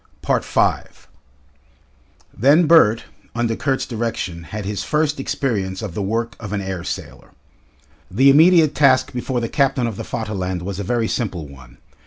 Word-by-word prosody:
5 - - -1 1.3
Then 145 - +4
Bert, 135 -9 +5 0.3
under 115 -1 0
Kurt's 135 +1 -1
direction, 110 -8 -4
had 105 +3 -6
his 105 0 -3
first 150 -1 0
experience 105 -8 -2
of 100 -6 -5
the 105 - -3
work 115 +4 -2
of 105 -2 -7
an 105 - -1
air 95 -3 -5
sailor. - - -7 0.8
The 135 +8 +5
immediate 160 0 +5
task 140 -1 +3
before 125 0 -2
the 115 - -2
captain 135 -1 +1
of 115 -4 -4
the - - -5
Vaterland 95 -6 -4
was 100 +1 -5
a - - -3
very 115 +2 0
simple 90 - -3
one. 65 -3 -15
115 Hz, 155 wpm, -20 LUFS, 95-135 Hz, 1.3 s, Bert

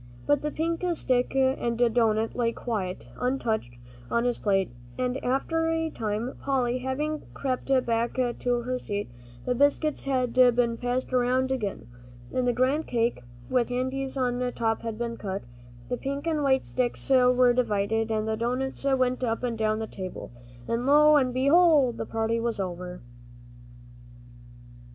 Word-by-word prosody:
But 290 -1 +2
the 300 - -1
pink 330 +3 -2
stick 255 -3 0
and 260 -3 +1
doughnut 225 -2 +2
lay 235 -2 +1
quite 185 - -4
untouched 225 - -1 0.3
on 235 - +1
his 245 -1 0
plate, 195 - +1 0.3
and 255 +1 -2
after 325 +6 0
a 325 -1 -1
time, 220 +3 -3
Polly 255 -3 0
having 295 +4 -2
crept 260 -2 -2 0.2
back 230 0 0
to 245 -1 0
her 255 +1 -2
seat, 205 - -4 0.3
the 250 - +1
biscuits 285 +3 +1
had 255 -3 0
been 245 -2 +4
passed 250 +2 -2
around 255 +1 +2
again, 215 -7 -3 0.5
and 255 -1 0
the - - +4
grand 260 +6 +1
cake 235 - 0 0.3
with 250 -2 +1
the 245 - -3
candies 265 +2 -2
on 250 -1 0
top 225 -1 0
had 225 -2 -4
been 235 0 -3
cut, 195 -1 -4 0.4
the 245 - -2
pink 280 +3 -4
and 315 -2 0
white 265 -2 +2
sticks 250 -2 -2
were 250 -1 +5
divided, 225 -2 0
and 215 -1 -1
the 220 - 0
doughnuts 250 +5 -2
went 255 0 0
up 230 0 -1
and 240 -2 -1
down 215 -1 0
the 220 - -3
table, 185 -4 -7 0.4
and 235 +2 -1
lo 300 +1 +6
and 260 -3 +3
behold! 280 0 +4
the - - -3
party 225 +1 0
was 230 -2 -2
over. 180 -3 -5
245 Hz, 160 wpm, -27 LUFS, 225-265 Hz, 0.5 s, lo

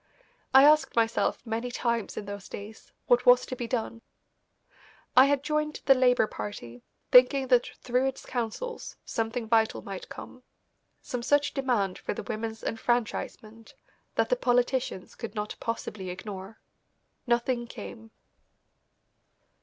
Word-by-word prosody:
I 265 +1 +8
asked 305 +1 +5
myself 230 +1 +1
many 230 +2 -3
times 235 -3 -2
in 210 - -4
those 200 -1 -8
days 210 +2 -10
what 245 0 +3
was 245 0 +7
to 255 - -5
be 240 -1 -4
done. 230 -2 -3 1.1
I 255 - +9
had 280 0 +1
joined 305 0 -1
the 270 - +8
Labour 250 -3 +4
Party, 120 - -7 0.3
thinking 255 +1 +6
that 245 -2 +4 0.2
through 250 +2 +1
its 265 - -5
councils 250 - -4
something 225 +1 -2
vital 225 -1 +2
might 195 -2 -7
come, 255 - -10 0.6
some 245 - -4
such 290 +3 +2
demand 240 -9 0
for - - -4
the - - -5
women's 220 0 -5
enfranchisement 225 -1 -3 0.4
that - - +1
the - - +3
politicians 245 - 0
could 230 -1 -8
not 210 0 -3
possibly 210 -4 -4
ignore. 195 +2 -7 0.7
Nothing 240 0 +1
came. 225 -1 -9
235 Hz, 135 wpm, -28 LUFS, 220-255 Hz, 1.1 s, I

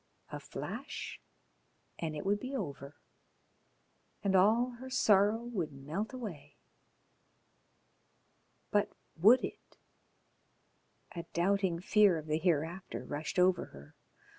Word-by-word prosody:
A - - -5
flash - - -6 0.8
and 155 -2 -3
it 150 - -5
would 205 +1 +2
be 260 +5 -5
over, 140 - -5 1.3
and 195 -1 +2
all 225 +7 +4
her 260 +1 -8
sorrow 215 -3 +3
would 195 -10 -3
melt 150 +10 -4
away.... 215 - -8 2.1
But - - +2 0.2
would 225 +10 +6
it? - - -11 1.4
A 170 - -3
doubting 185 -1 +1
fear 200 -2 +4
of 155 - -6
the 155 0 0
hereafter 165 -3 -1
rushed 150 +6 -4
over 180 -1 +4
her. 70 +1 -14
185 Hz, 110 wpm, -33 LUFS, 155-210 Hz, 2.1 s, would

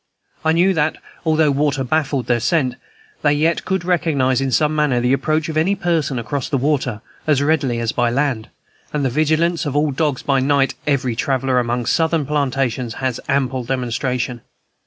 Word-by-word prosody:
I 160 - +3
knew 180 +3 +3
that, 155 -2 0 0.3
although 155 -2 +3
water 140 -1 0
baffled 140 -1 0
their 120 -1 +1
scent, 130 0 +1 0.5
they 145 -1 +3
yet 160 +3 +1
could 190 -2 -1
recognize 140 -8 +1
in 135 -1 -1
some 150 +5 +2
manner 150 -5 +2
the 125 +2 +2
approach 155 +3 0
of 160 -1 -3
any 180 +6 +2
person 165 -8 0
across 130 +4 -3
water 135 -5 0 0.3
as 150 -3 +3
readily 145 -5 +1
as 115 -1 -1
by 120 -1 +1
land; 125 -4 -1 0.4
and 145 -2 0
of 130 - -1
the - - -10
vigilance 160 +2 +1
of 140 - -3
all 145 0 +2
dogs 145 -1 -1
by 135 -1 +2
night 135 0 +2
every 130 -5 +1
traveller 130 0 +1
among 120 0 -1
Southern 160 +2 +1
plantations 130 -4 -1
has 130 -2 -2
ample 130 -2 0
demonstration. 125 0 -2
140 Hz, 180 wpm, -19 LUFS, 125-155 Hz, 0.5 s, I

